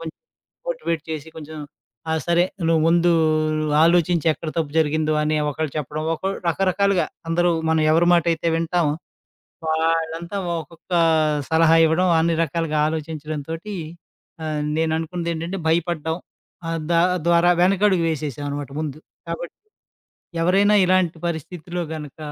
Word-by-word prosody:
కొంచం 165 -1 -7 0.5
మోటివేట్ 470 - -2
చేసి 155 0 -5
కొంచెం, 155 0 -8 0.5
"ఆ! - - +1
సరే 170 0 +3 0.3
నువ్వు 165 -1 +3
ముందు 170 +1 +4 0.7
ఆలోచించి 170 -1 +3
ఎక్కడ 155 - -7
తప్పు 155 -3 -2
జరిగిందో" 155 0 +1
అని 155 0 +1
ఒకళ్ళు 155 0 -3
చెప్పడం. 150 +2 -4
ఒకొల్ 195 +4 -3
రకరకాలుగా 195 +2 +2 0.2
అందరూ 175 +1 +2 0.2
మనం 160 0 +3
ఎవరి 165 +2 +4
మాటైతే 170 -1 +1
వింటాం, 165 0 +1 0.8
వాళ్ళంతా 165 +3 -1 0.2
ఒక్కొక్క 165 +4 -11 0.6
సలహా 160 0 +5
ఇవ్వడం, 180 +4 +2
అన్ని 165 +1 +2
రకాలుగా 165 0 -2
ఆలోచించడం 155 -1 -4
తోటి 165 +6 -5 0.7
ఆహ్, 155 -1 -2 0.2
నేను 160 0 +1
అనుకున్నదేంటంటే 170 +2 -3
భయపడ్డం 160 -1 0 0.5
ఆహ్, 165 0 -2
దా 170 - +4 0.3
ద్వారా 170 +1 +5
వెనకడుగు 190 -1 +3
వేసేసామనమాట 145 -2 -4
ముందు. 150 -2 -4 0.3
కాబట్టి, - - -5 0.9
ఎవరైనా 195 +4 +4
ఇలాంటి 180 -2 +2
పరిస్థితిలో 175 +2 -4
గనుక 150 -2 -8
165 Hz, 120 wpm, -22 LUFS, 155-175 Hz, 0.9 s, సలహా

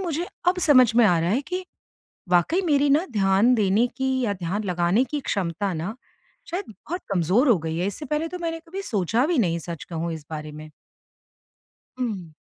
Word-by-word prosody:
मुझे 345 -1 -2 0.2
अब 365 0 +2
समझ 255 -5 +6
में 240 - +7
आ 175 -3 +3
रहा 170 +2 0
है 250 +6 +2
कि 365 0 -3 0.6
वाक़ई 180 - +3
मेरी 285 -2 +3
ना 315 +7 +3
ध्यान 200 +4 +3
देने 215 +1 +3
की 265 -1 0
या 205 - 0
ध्यान 190 +4 -3
लगाने 180 +5 +2
की 290 +3 -4
क्षमता 195 -3 -2
ना 170 +7 -4 0.6
शायद 370 +4 -3
बहुत 335 - -7
कमज़ोर 195 - +3
हो 215 -7 +5
गई 160 0 -4
है, 180 - 0
इससे 205 +9 -5
पहले 300 +4 -1
तो 360 - -6
मैंने 330 -1 -3
कभी 390 +3 -5
सोचा 225 - 0
भी 340 -3 +1
नहीं 170 -7 +1
सच 170 -1 -7
कहूँ 165 0 -4
इस 155 -2 -9
बारे 155 -1 -6
में। 155 +1 -10 1.3
हुँ। 195 -10 -3
210 Hz, 195 wpm, -24 LUFS, 175-290 Hz, 1.3 s, में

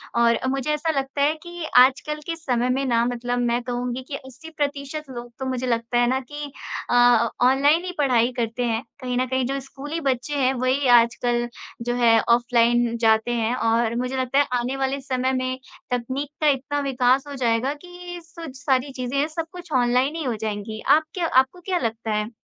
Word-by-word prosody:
और 235 -1 +4
मुझे 270 +2 -2
ऐसा 320 +2 0
लगता 270 +1 -3
है 295 +2 +4
कि 345 -1 -7
आजकल 275 +4 +4
के 335 - -2
समय 250 -6 -1
में 270 +2 0
ना 235 -2 +2
मतलब 245 0 -2
मैं 240 0 +1
कहूँगी 245 0 -3
कि 285 - -5
80% 285 +1 -5
लोग 240 -1 -8
तो 265 - -3
मुझे 255 -1 -2
लगता 235 0 0
है 240 0 +4
ना 260 +1 +1
कि 290 +2 -8 0.4
अ, 245 -2 +5 0.2
ऑनलाइन 285 +6 +4
ही 365 - -3
पढ़ाई 250 -4 +3
करते 230 +1 -1
हैं 230 +1 -1 0.2
कहीं 250 -1 -2
न 255 - +2
कहीं 260 0 0
जो 275 +2 -2
स्कूली 290 +4 -6
बच्चे 270 0 -1
हैं 265 -1 +2
वही 255 +2 0
आजकल 240 +1 0 0.4
जो 240 0 0
है 230 -2 +5
ऑफ़लाइन 240 0 +3
जाते 220 +1 +3
हैं। 230 +1 0
और 230 0 +1
मुझे 250 +2 -2
लगता 260 +2 +1
है 285 - +4
आने 250 +3 -2
वाले 270 +1 -1
समय 260 0 -1
में 255 0 -1 0.3
तकनीक 260 +4 -2
का 305 - +3
इतना 285 +1 +1
विकास 265 0 +2
हो 285 - -6
जाएगा 235 +4 +1
कि 355 0 -9
सु 330 0 -10
सारी 265 0 +1
चीज़ें 255 +1 -4
हैं 295 - +2
सब 325 +1 -4
कुछ 355 -3 -11
ऑनलाइन 250 +5 +2
ही 325 - -3
हो 245 -4 -1
जाएँगी। 215 0 -5 0.2
आप 315 - -1
क्या 350 -3 -1
आपको 265 +6 +2
क्या 370 0 -1
लगता 225 -2 -3
है? 210 +1 -1
255 Hz, 200 wpm, -23 LUFS, 240-285 Hz, 0.4 s, अ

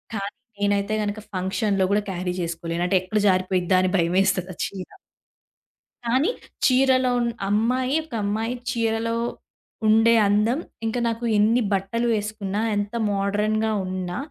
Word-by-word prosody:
కానీ 200 -1 -4 0.2
నేనైతే 205 +1 +1
గనుక 205 +1 -3 0.2
ఫంక్షన్‌లో 190 +1 0
గూడా 210 0 +2
క్యారీ 180 0 -3
జేసుకోలేను. 170 0 -3
అంటే 190 - +3
ఎక్కడ 210 +4 -1
జారిపోయిద్దా 185 0 +2
అని 185 - +2
భయమేస్తది 185 +2 +1
ఆ - - -30
చీర. 190 -2 -8 1.2
కానీ 260 - +2 0.4
చీరలో 255 -1 +4
ఉన్ 240 -1 +1 0.2
అమ్మాయి 250 +6 +1
ఒక 310 - -16
అమ్మాయి 220 +4 -1 0.2
చీరలో 230 -1 0 0.7
ఉండే 225 +2 +5
అందం 210 +7 +2 0.3
ఇంకా 225 +2 -1
నాకు 230 +1 -2
ఎన్ని 220 +4 +4
బట్టలు 195 +5 0
వేసుకున్నా 210 -1 -2
ఎంత 205 +1 -2 0.2
మోడ్రన్‌గా 210 +2 0
ఉన్నా 185 -1 -4
205 Hz, 130 wpm, -24 LUFS, 190-230 Hz, 1.2 s, ఉండే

